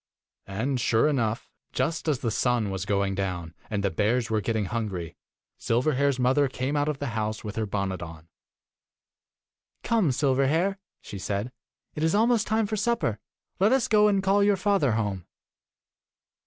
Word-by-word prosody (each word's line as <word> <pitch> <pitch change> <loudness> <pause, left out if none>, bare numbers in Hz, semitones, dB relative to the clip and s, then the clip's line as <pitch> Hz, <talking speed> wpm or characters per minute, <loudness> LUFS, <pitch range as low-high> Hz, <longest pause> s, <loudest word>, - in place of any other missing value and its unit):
And, 120 +7 -2
sure 115 +3 +3
enough, 115 -6 -1 0.3
just 160 +6 -1
as 150 -3 +2
the 115 - -1
sun 120 -3 +1
was 95 0 -4
going 100 -1 +1
down, 90 -4 -3 0.2
and 105 -2 -2
the 100 - +1
bears 110 +6 0
were 110 -1 +1
getting 110 0 -1
hungry, 95 -6 -4 0.5
Sil 115 0 +1
verhair's 140 -2 +2
mother 130 +3 +3
came 130 +2 -3
out 145 +1 +1
of 150 - -2
the 140 -1 -3
house 110 0 -2
with 105 -1 -6
her 110 -1 -1
bonnet 100 -2 -2
on. 80 -1 -9 1.6
'Come, 225 -8 +2
Silverhair,' 145 +8 +1 0.2
she 100 - -8
said. 100 +5 -3 0.4
'It 150 - -5
is 160 +4 +2
almost 225 +1 +3
time 220 +1 +2
for 215 +1 -2
supper. 210 - 0 0.4
Let 200 +4 +4
us 260 -1 +3
go 210 -3 +5
and 195 -2 +2
call 200 +1 +3
your 205 -1 +3
father 185 - +2
home. 100 -5 -2
125 Hz, 170 wpm, -26 LUFS, 105-160 Hz, 1.6 s, go